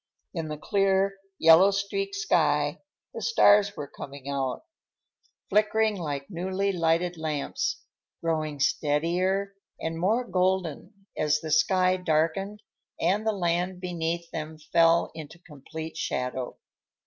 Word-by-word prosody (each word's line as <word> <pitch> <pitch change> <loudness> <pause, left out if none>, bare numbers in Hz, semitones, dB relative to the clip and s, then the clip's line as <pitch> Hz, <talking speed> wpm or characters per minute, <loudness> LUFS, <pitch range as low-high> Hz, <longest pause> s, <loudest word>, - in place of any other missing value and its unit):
In 165 -4 -3
the 155 0 -5
clear, 195 +2 +1 0.2
yellow 165 +4 +7
streaked 300 - -2
sky 415 +2 +1 0.3
the - - -6
stars 205 - +4
were 145 - -5
coming 140 0 -10
out, 135 - -2 0.8
flickering 215 0 +2
like 145 -6 -4
newly 190 +2 -1
lighted 170 0 +1
lamps, 155 -3 -2 0.4
growing 155 -3 -2
steadier 175 +8 +1 0.3
and 165 0 -3
more 215 +8 +2
golden 190 0 -1
as 150 0 +1
the 160 0 -6
sky 185 +4 +3
darkened 180 +5 0 0.4
and 200 +6 +1
the - - +4
land 180 -1 -1
beneath 170 -1 -3
them 155 0 -5
fell 165 +2 +3
into 160 0 -9
complete 160 0 -9
shadow. 125 -3 -3
170 Hz, 120 wpm, -27 LUFS, 155-195 Hz, 0.8 s, yellow